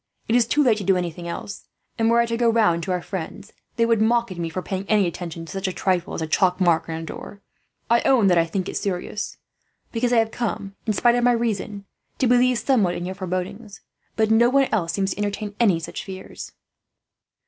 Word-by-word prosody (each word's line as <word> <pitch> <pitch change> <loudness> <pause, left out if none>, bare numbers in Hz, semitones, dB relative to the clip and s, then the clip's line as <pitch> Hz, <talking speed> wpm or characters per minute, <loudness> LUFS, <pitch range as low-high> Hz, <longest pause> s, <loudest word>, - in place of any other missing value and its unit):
It 230 - +2
is 240 -2 +4
too 295 +4 +3
late 225 -5 +3
to - - -4
do 190 0 +3
anything 175 -1 -4
else 190 +3 -7 0.3
and, 225 0 +3
were 235 0 +4
I - - +2
to 230 0 -2
go 235 0 +2
round 215 -7 +3
to 185 - -3
our 180 -1 -1
friends, 190 +2 -7 0.2
they 230 - +2
would 230 -2 +2
mock 235 -1 +2
at 180 - -7
me 165 -1 -2
for 180 +3 -4
paying 190 0 -3
any 210 -2 +4
attention 170 -1 -5
to 160 - -10
such 195 0 -3
a - - -1
trifle 180 0 -1
as 160 - -3
a - - -3
chalk 180 +3 +2
mark 165 -3 +2
on 160 - -3
a 165 - -5
door. 200 +5 -9 0.5
"I 235 +1 +4
own 255 -6 +4
that 180 -3 +4
I 165 - +2
think 185 +2 -3
it - - -5
serious, 200 +2 -3 0.5
because 240 +1 0
I 245 - +4
have 225 -1 +2
come, 205 -4 -3
in 215 - +2
spite 240 +4 +3
of 245 0 +1
my 245 0 +5
reason, 210 -3 -2 0.3
to 260 - +1
believe 250 0 +4
somewhat 220 -9 +2
in 175 0 -4
your 185 - -4
forebodings; 190 +3 -5 0.3
but 220 -1 +2
no 235 +2 +5
one 275 +1 +3
else 170 -6 0
seems 195 +1 0
to - - -5
entertain 205 0 -3
any 200 -8 +4
such 165 - -6
fears." 190 -1 -9
200 Hz, 235 wpm, -23 LUFS, 180-230 Hz, 0.5 s, my